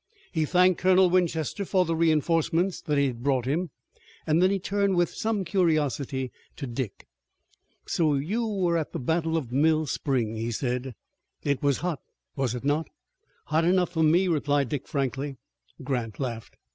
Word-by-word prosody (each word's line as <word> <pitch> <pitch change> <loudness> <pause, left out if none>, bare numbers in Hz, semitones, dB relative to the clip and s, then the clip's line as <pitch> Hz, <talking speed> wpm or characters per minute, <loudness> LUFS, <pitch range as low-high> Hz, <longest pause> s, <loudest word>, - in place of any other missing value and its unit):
He 160 -3 0
thanked 180 +2 +3
Colonel 185 -1 +5
Winchester 175 0 0
for 185 -1 +2
the 165 0 -1
reinforcement 165 +3 +1
that 150 -1 +1
he 140 - +3
had 120 -3 -3
brought 130 -2 +1
him, 160 +7 -1 0.6
and 160 +2 +2
then 190 +2 +3
turned 200 +1 0
with 175 -1 +2
some 215 -3 -1
curiosity 150 - 0 0.2
to 140 - -5
Dick. 120 -3 -5 0.8
"So 155 -4 +1
you 205 +12 -1
were 185 -5 +1
at 155 - -5
the - - -3
battle 160 +4 0
of 130 -7 -4
Mill 155 +4 +3
Spring," 125 -6 -1
he 115 +1 -2
said. 125 +1 -2 0.5
"It 140 -2 0
was 140 -2 +2
hot, 170 -5 -1 0.4
was 130 -3 -1
it 125 - -6
not?" 145 +2 +1 0.6
"Hot 160 +2 +1
enough 180 0 +2
for 165 -2 -1
me," 170 +4 +4
replied 145 -5 +1
Dick 140 -2 -4
frankly. 135 0 -2 0.5
Grant 125 -5 -3
laughed. 120 -4 -5
155 Hz, 165 wpm, -26 LUFS, 135-175 Hz, 0.8 s, Colonel